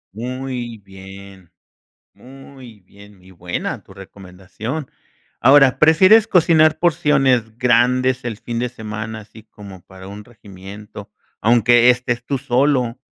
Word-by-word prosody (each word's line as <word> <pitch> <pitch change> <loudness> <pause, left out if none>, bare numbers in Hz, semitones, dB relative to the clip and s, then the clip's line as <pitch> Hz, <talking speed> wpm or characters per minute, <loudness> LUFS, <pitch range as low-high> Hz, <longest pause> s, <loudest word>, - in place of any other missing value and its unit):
Muy 125 0 -6
bien, 95 -2 -15 0.6
muy 130 -4 -15
bien, 100 +2 -19
muy 90 +1 -20
buena 90 -1 -6
tu 95 - -17
recomendación. 95 - -9 0.5
Ahora, 135 -1 +4
¿prefieres 185 +8 +5
cocinar 155 -4 +3
porciones 135 -9 +1
grandes 125 +1 +1
el 115 -3 -5
fin 120 0 -6
de 125 +1 -2
semana, 110 -1 -8
así 105 +1 -17
como 100 -4 -14
para 95 +1 -14
un 105 +1 -11
regimiento, 100 -2 -13 0.3
aunque 120 +2 +3
estés 120 -1 -2
tú 140 +1 -3
solo? 130 -2 0
120 Hz, 120 wpm, -18 LUFS, 100-130 Hz, 0.6 s, prefieres